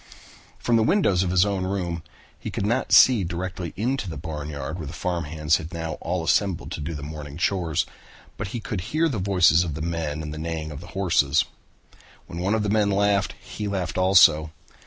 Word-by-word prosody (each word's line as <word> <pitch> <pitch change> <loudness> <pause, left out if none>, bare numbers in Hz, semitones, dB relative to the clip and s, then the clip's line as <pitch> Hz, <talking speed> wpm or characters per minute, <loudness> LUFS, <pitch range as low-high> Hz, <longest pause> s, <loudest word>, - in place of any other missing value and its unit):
From 120 -1 +2
the - - +3
windows 110 - +3
of 95 - 0
his 90 +1 +4
own 100 -2 -1
room 90 -3 -2 0.4
he - - -5
could - - -3
not 120 +5 0
see 120 -6 +7
directly 90 0 -4
into 120 -1 -1
the 80 - -6
barnyard 75 0 -5
where 80 - -5
the 80 - -7
farm 85 -1 -2
hands 75 +1 +1
had 80 +1 -8
now 80 -2 -5
all 85 0 -2
assembled 85 -4 +1
to 80 - -4
do 80 +2 -4
the 70 - -6
morning 75 -1 -7
shores, 85 -4 0 0.5
but 110 - -4
he 115 - -5
could 110 -4 -4
hear 155 - 0
the 125 -9 -2
voices 90 -3 +4
of 80 -5 -4
the 80 - -5
men 80 -2 -3
and 75 -1 -5
the 75 - -6
neighing 80 -1 -4
of 75 +1 -8
the 85 - -11
horses. 80 -6 +3 0.8
When 85 - -7
one 95 +4 +1
of 110 - 0
the 105 - -1
men 105 -1 +2
laughed, 100 0 +1
he 105 - -6
laughed 95 -2 -2
also. 80 -5 +6
85 Hz, 210 wpm, -24 LUFS, 80-100 Hz, 0.8 s, see